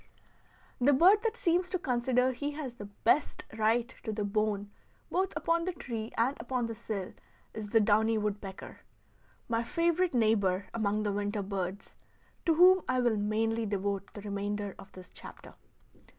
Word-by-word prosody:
The 275 +3 +5
bird 375 +9 +6
that 460 0 -1
seems 355 -1 +1
to 370 - 0
consider 250 -3 +1
he 285 +3 -4
has 285 -5 -5
the 210 -4 -9
best 225 +8 0
right 230 +3 +1
to 220 - -4
the 210 0 -2
bone 205 0 -1 0.4
both 375 +1 +1
upon 335 0 +1
the 370 - -2
tree 230 -8 -5
and 250 +5 +2
upon 245 0 -2
the 230 - -4
sill 200 -3 -5 0.4
is 215 -1 -6
the 225 - +4
downy 220 +1 +3
woodpecker, 205 -2 -5 0.7
my 230 -1 0
favorite 340 +4 +1
neighbor 205 -4 +2
among 215 -1 0
the 205 - 0
winter 205 0 -2
birds, 190 0 -4 0.5
to 325 - +4
whom 365 +3 +7
I 255 0 +2
will 240 -3 +2
mainly 220 +2 0
devote 200 -1 -2
the 205 - -7
remainder 205 0 -3
of - - -12
this 185 -1 -12
chapter. - - -11
225 Hz, 165 wpm, -30 LUFS, 205-265 Hz, 0.7 s, whom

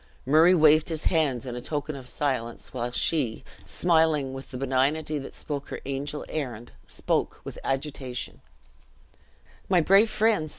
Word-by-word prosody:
Murray 160 +7 +6
waved 155 -1 +5
his 160 -2 -3
hands 145 -7 +1
in 125 -1 -5
token 150 +2 -3
of 130 -2 -8
silence; 130 -6 -3
while 120 -1 -2
she, 125 -3 0 0.2
smiling 160 -5 +2
with 135 0 -8
the 130 - -6
benignity 135 +4 0
that 135 - -9
spoke 140 -2 -5
her - - -5
angel 140 +2 -4
errand, 120 -6 -5 0.2
spoke - - -1
with - - -8
agitation: 135 -2 -4 1.3
"My 185 -2 +5
brave 195 +6 +5
friends!" 215 -9 +2
145 Hz, 140 wpm, -26 LUFS, 130-160 Hz, 1.3 s, Murray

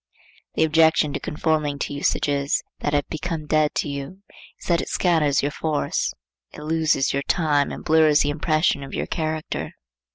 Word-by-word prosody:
The - - +3
objection 160 -1 +3
to - - -2
conforming 150 -2 -1
to 145 - -3
usages 140 0 0 0.2
that 145 - -2
have 145 -1 +1
become 160 -1 -4
dead 155 0 +1
to - - 0
you 140 +7 -6 0.4
is - - -13
that 170 -1 +2
it - - -6
scatters 155 -6 +2
your 145 - 0
force. 155 0 -1 0.4
It 150 - -9
loses 155 -3 +1
your 140 - 0
time 145 -2 +1
and - - -8
blurs 155 -2 +5
the 145 - +1
impression 155 -1 +1
of 135 - -7
your - - -2
character. 155 -1 -3
150 Hz, 170 wpm, -23 LUFS, 145-160 Hz, 0.4 s, blurs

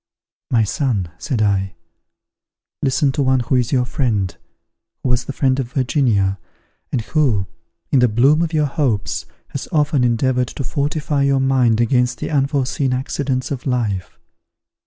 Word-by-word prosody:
"My 115 -2 +3
son," 110 - -1
said 125 -7 -1
I, 95 -2 0 1.1
"listen 135 +1 +2
to 140 - -1
one 130 -1 +3
who 120 - -2
is 125 -1 +1
your 125 -2 +2
friend, 105 - -1 0.7
who - - 0
was 125 +1 +1
the - - -4
friend 135 -1 +1
of 125 0 -4
Virginia, 120 - +1 0.5
and 125 - 0
who, 115 -7 +1 0.5
in 135 - +4
the 125 - +5
bloom 130 +8 +3
of 165 -2 0
your 155 -2 +2
hopes, 135 -7 -1 0.2
has - - -5
often 150 -3 +2
endeavoured 125 +1 +1
to 140 - -6
fortify 145 +2 -1
your 140 -1 +3
mind 130 -4 +3
against 125 +1 +2
the - - -4
unforeseen 135 -2 0
accidents 130 0 -2
of 135 0 -4
life. 105 -8 -2
130 Hz, 155 wpm, -19 LUFS, 115-140 Hz, 1.1 s, the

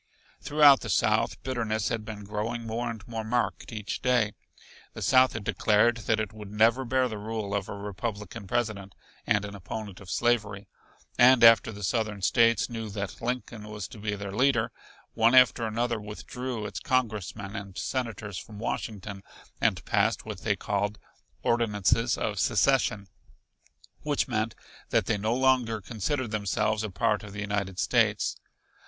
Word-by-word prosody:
Throughout 145 -2 +6
the - - -7
South, - - +2
bitterness 115 -5 -1
had 115 -2 -2
been 105 -1 -7
growing 110 +3 -3
more 115 +2 -2
and 115 0 -7
more 115 -1 -4
marked 120 +3 -1
each 105 -1 -4
day. 120 -5 +2 0.6
The - - -5
South 130 -1 +5
had 115 - -5
declared 110 +3 +3
that 110 -1 +2
it 110 0 -3
would 105 -2 -9
never 115 +5 +3
bear 130 +1 +2
the 110 -3 -6
rule 105 -1 -4
of 100 -1 -2
a - - -5
Republican 105 0 -5
President 100 -4 -2 0.3
and 105 -1 +2
an 100 - -7
opponent 100 0 -7
of 100 - -12
slavery. 105 -4 0 0.5
And 125 0 +7
after 115 0 +7
the 105 -1 -9
Southern 105 +1 -1
States 115 +2 +4
knew 115 -2 -5
that 100 -1 -5
Lincoln 115 -3 -4
was 105 -4 -5
to 110 - -11
be 105 0 -2
their 100 -1 -6
leader, 120 0 +2 0.4
one 115 +2 +4
after 125 -2 +5
another 115 0 -1
withdrew 115 +2 -5
its 105 - -5
congressmen 110 -6 -2
and 100 -2 -7
senators 110 -7 -3
from 105 -2 -11
Washington, 100 -2 -4 0.4
and - - +1
passed - - +1
what - - -6
they - - +1
called 105 +1 -2 0.5
"ordinances 115 0 +2
of 105 -3 -2
secession," 105 -2 +2 0.9
which 150 -1 0
meant 110 -3 -1 0.3
that - - +2
they 105 - 0
no 110 +3 0
longer 125 -4 +2
considered 120 +4 -3
themselves 105 +1 0
a 110 - -3
part 105 +2 0
of 105 -2 -10
the 105 - -5
United 100 -2 -2
States. - - +2
110 Hz, 160 wpm, -28 LUFS, 105-120 Hz, 0.9 s, And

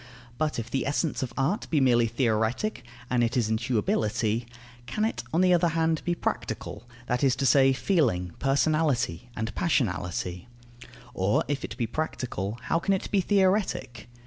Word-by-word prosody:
But 155 -1 0
if 115 - -5
the 135 - -1
essence 145 +2 -1
of 130 - -3
art 150 - 0
be 155 - +2
merely 120 -3 +4
theoretic 115 - 0 0.2
and 125 -1 +1
it 120 +2 0
is 115 -3 +1
intuibility 110 0 0 0.4
can 215 0 0
it, 220 - -2
on 165 - +2
the 185 -1 +5
other 175 0 +4
hand, 160 -1 +1
be 175 - 0
practical, 120 -7 -4 0.2
that 125 +1 -1
is 135 -1 +4
to 135 - -1
say, 135 0 +5
feeling, 125 - +1
personality, 135 - +1
and 110 +1 -3
passionality? 90 - -1 0.7
Or, 95 +3 +1
if 145 -1 -2
it - - -6
be 120 - 0
practical, 115 -6 -3
how 145 +6 +1
can 195 +3 +1
it 190 - -5
be 200 - +3
theoretic? 185 - 0
130 Hz, 165 wpm, -27 LUFS, 115-160 Hz, 0.7 s, the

